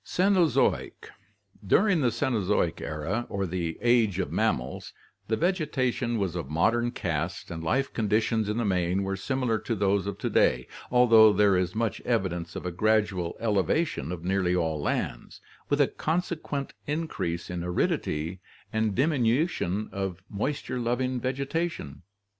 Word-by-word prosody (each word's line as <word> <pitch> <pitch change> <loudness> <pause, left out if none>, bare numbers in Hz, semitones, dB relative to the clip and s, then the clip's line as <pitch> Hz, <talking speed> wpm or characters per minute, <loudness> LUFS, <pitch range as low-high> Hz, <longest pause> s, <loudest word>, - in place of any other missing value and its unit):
Cenozoic 185 -3 +1 0.5
During 180 - +3
the 125 - +3
Cenozoic 105 -7 0
era 85 +10 -3
or 100 -2 -2
the 85 -2 -3
Age 115 -6 +3
of 95 - -2
Mammals, 60 +2 -1 0.3
the 110 - 0
vegetation 135 -9 0
was 95 -5 -1
of 85 -6 -4
modern 115 +10 +2
cast 85 -5 -3
and 80 -1 -5
life 135 +12 0
conditions 110 0 +1
in 105 - -1
the 120 - 0
main 90 0 +1
were 95 0 -2
similar 120 +2 -1
to 115 - -2
those 100 -1 +1
of 100 -1 -4
to - - -2
day, 60 0 +3 0.2
although 115 -3 +7
there 105 -2 +4
is 90 +1 0
much 115 -1 -1
evidence 95 -7 -1
of - - -6
a 90 - -2
gradual 105 -3 +1
elevation 105 - 0
of 85 -2 -6
nearly 90 -1 +1
all 80 -4 0
lands, - - -3 0.3
with 145 - +1
a 145 - +5
consequent 160 -4 -2
increase 145 - -3
in 90 -1 -3
aridity 85 -1 -1 0.3
and 110 -2 0
diminution 125 - +1
of 95 -2 -4
moisture 125 +4 -2
loving 125 +2 -1
vegetation. 140 - -3
105 Hz, 145 wpm, -27 LUFS, 90-125 Hz, 0.5 s, although